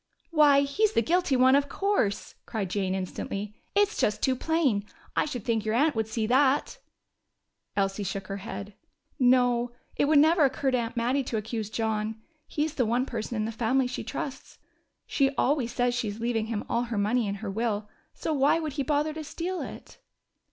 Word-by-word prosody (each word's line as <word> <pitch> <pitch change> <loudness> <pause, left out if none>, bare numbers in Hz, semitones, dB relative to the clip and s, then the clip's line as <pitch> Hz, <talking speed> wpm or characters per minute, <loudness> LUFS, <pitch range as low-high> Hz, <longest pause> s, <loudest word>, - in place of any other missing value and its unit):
"Why, 295 -3 +6
he's 405 +10 +1
the 230 - +3
guilty 350 0 +2
one, 260 +1 +5
of 280 0 +2
course!" 385 - 0
cried 205 -6 -3
Jane 190 -2 0
instantly. 195 +2 -4 0.2
"It's 410 +1 +2
just 210 - +1
too 260 - +3
plain. 275 -8 +1 0.3
I - - +2
should 250 -8 -5
think 225 -2 +1
your 220 0 0
aunt 295 +5 +3
would 220 -2 -1
see 220 0 -1
that." 270 - +2 1.0
Elsie 195 0 0
shook 195 0 -3
her 195 +1 -5
head. 200 0 -7 0.5
"No, 245 -1 +3 0.2
it - - +2
would 300 +1 +4
never 315 +2 +5
occur 265 0 +1
to 255 - +2
Aunt 230 +1 -4
Mattie 250 +4 +1
to 225 - -2
accuse 220 0 -3
John. 220 0 -2 0.3
He's 300 0 -1
the 255 -6 +1
one 245 +3 +1
person 235 -1 -4
in 215 -1 0
the 225 - -3
family 245 +4 +1
she 250 0 -4
trusts. 270 -2 -6 0.5
She 275 -2 +2
always 265 -4 +1
says 245 0 +1
she 245 -2 -1
is 205 +1 -5
leaving 225 -1 -1
him 220 -2 -3
all 235 +1 0
her 235 -2 -4
money 215 +3 +1
in 200 - -2
her 205 0 -5
will 215 -1 -1 0.3
so 320 - -2
why 285 +3 +3
would 310 -3 -3
he 280 - -2
bother 295 +3 0
to 315 0 -6
steal 350 +4 -4
it?" - - -9
245 Hz, 195 wpm, -27 LUFS, 215-285 Hz, 1.0 s, Why